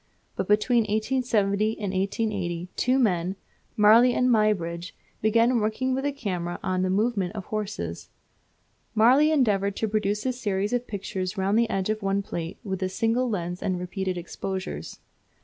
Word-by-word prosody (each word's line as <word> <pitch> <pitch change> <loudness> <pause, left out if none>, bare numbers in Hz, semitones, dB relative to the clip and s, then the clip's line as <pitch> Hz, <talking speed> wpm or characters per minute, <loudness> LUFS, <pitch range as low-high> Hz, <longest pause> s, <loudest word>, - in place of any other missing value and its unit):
But - - -2
between 215 +4 +3
1870 215 -2 +1
and 205 -3 -4
1880 190 -3 -2
two 255 +1 +2
men, 185 -6 +1 0.4
Marey 225 +4 +6
and 250 +1 +2
Muybridge, 185 -6 +1 0.3
began 230 +3 +3
work 215 0 -1
with 260 +1 0
the 285 - 0
camera 180 -10 -4
on 185 0 0
the 185 - +1
movements 205 -1 0
of 200 -4 -5
horses. 195 - -4 0.9
Marey 255 +8 +5
endeavoured 205 -9 +2
to 220 - -1
produce 210 0 -1
a 255 - +1
series 205 -3 -2
of 245 0 -1
pictures 190 -1 -4
round 195 +3 +2
the 235 - +2
edge 195 +2 0
of 215 0 -3
one 195 0 0
plate 170 -3 -5
with 190 -2 -4
a 185 - 0
single 230 +6 0
lens 175 -4 -3
and 185 -2 -1
repeated 185 +1 -3
exposures. 190 +2 -5
205 Hz, 160 wpm, -26 LUFS, 185-230 Hz, 0.9 s, Marey